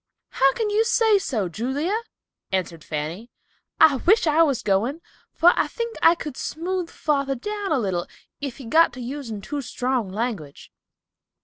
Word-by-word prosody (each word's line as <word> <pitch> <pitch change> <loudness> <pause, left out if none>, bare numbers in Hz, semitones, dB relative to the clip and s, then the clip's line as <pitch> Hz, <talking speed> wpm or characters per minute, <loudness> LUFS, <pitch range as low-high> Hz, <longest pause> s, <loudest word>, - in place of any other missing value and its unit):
"How 270 0 +3
can 435 -2 -1
you 430 +2 +3
say 450 -2 +3
so, 225 - -2
Julia?" 265 - -2 0.6
answered 170 -4 -2
Fanny. 160 +9 -5 0.5
"I 285 -4 +7
wish 370 - +3
I 310 +1 +4
was 280 -7 +2
going, 215 +9 +1 0.3
for 350 +2 +5
I - - +1
think 465 -1 -4
I 330 - +6
could 300 -5 -7
smooth 355 +2 -3
father 275 -3 -1
down 410 - -4
a 310 - +3
little 185 -7 -1 0.3
if 280 -4 -5
he 270 - -10
got 320 +5 +4
to 255 - -9
using 245 -4 -5
too 290 +7 -4
strong 250 -4 -2
language." 205 - -4
275 Hz, 165 wpm, -23 LUFS, 220-335 Hz, 0.6 s, I